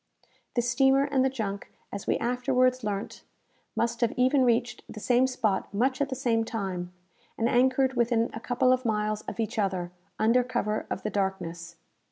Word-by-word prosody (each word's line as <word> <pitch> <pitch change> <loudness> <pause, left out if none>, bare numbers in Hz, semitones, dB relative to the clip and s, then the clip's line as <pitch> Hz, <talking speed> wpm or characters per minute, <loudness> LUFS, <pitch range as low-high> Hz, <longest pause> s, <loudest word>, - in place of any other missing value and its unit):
The 240 - +2
steamer 265 +3 +3
and 280 -2 +1
the 265 - +3
junk, 210 -6 -5 0.2
as 200 - -6
we - - +2
afterwards 255 +1 +1
learnt, 205 -1 -4 0.5
must 235 +1 -1
have 235 - +3
even 260 +2 +3
reached 240 0 +1
the 215 - -8
same 250 +4 +3
spot 215 -6 -1
much 260 +7 0
at 280 - +1
the 260 - -3
same 235 -3 +1
time, 190 -6 -4 0.5
and 230 - +1
anchored 260 +2 +3
within 235 -1 +1
a 225 - -5
couple 255 +2 +2
of 255 0 -1
miles 215 -2 0
of - - -6
each 225 +1 -2
other, 185 -3 -1 0.3
under 230 +3 +3
cover 215 -4 -2
of - - -4
the 215 - -2
darkness. 180 -4 -3
235 Hz, 180 wpm, -27 LUFS, 210-255 Hz, 0.5 s, steamer